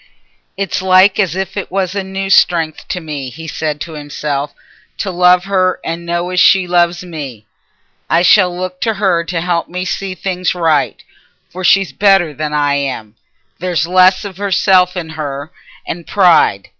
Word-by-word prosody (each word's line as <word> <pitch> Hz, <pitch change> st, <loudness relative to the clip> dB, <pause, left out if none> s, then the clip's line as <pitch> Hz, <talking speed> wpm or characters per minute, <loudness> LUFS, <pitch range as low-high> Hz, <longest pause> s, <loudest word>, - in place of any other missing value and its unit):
"It's 195 Hz, -1 st, -2 dB
like 190 Hz, +2 st, +4 dB
as 185 Hz, -5 st, +1 dB
if 190 Hz, 0 st, -4 dB
it 200 Hz, -, -4 dB
was 185 Hz, -1 st, -2 dB
a 200 Hz, -1 st, -2 dB
new 195 Hz, 0 st, -4 dB
strength 165 Hz, -5 st, +2 dB
to 180 Hz, -, -3 dB
me," 150 Hz, -5 st, -6 dB
he 160 Hz, +6 st, -10 dB
said 155 Hz, -1 st, -3 dB
to 170 Hz, -1 st, -6 dB
himself, 145 Hz, -1 st, -4 dB, 0.5 s
"to 195 Hz, -, -3 dB
love 180 Hz, 0 st, +4 dB
her 185 Hz, -1 st, 0 dB
and 170 Hz, +1 st, -5 dB
know 175 Hz, +1 st, -2 dB
as 180 Hz, -, 0 dB
she 190 Hz, 0 st, +5 dB
loves 175 Hz, 0 st, +1 dB
me. 140 Hz, -11 st, -8 dB, 0.6 s
I 170 Hz, +1 st, +3 dB
shall 185 Hz, 0 st, +5 dB
look 180 Hz, +1 st, -6 dB
t' 225 Hz, -, +1 dB
her 190 Hz, -5 st, +1 dB
to 170 Hz, 0 st, -3 dB
help 170 Hz, -1 st, -1 dB
me 180 Hz, +1 st, -4 dB
to -, -, -2 dB
see 195 Hz, -1 st, -4 dB
things 185 Hz, -1 st, -2 dB
right. 165 Hz, -3 st, 0 dB, 0.5 s
For 185 Hz, +2 st, -7 dB
she's 195 Hz, +1 st, +3 dB
better 195 Hz, -6 st, +3 dB
than 150 Hz, +1 st, -4 dB
I 145 Hz, -1 st, +1 dB
am—there's 140 Hz, -, -4 dB
less 185 Hz, +3 st, +3 dB
o' 200 Hz, +1 st, -5 dB
self 185 Hz, -1 st, +3 dB
in 165 Hz, -2 st, -5 dB
her, 150 Hz, -1 st, -6 dB, 0.3 s
and 170 Hz, 0 st, -6 dB
pride. 175 Hz, -, +3 dB
180 Hz, 175 wpm, -15 LUFS, 160-185 Hz, 0.6 s, she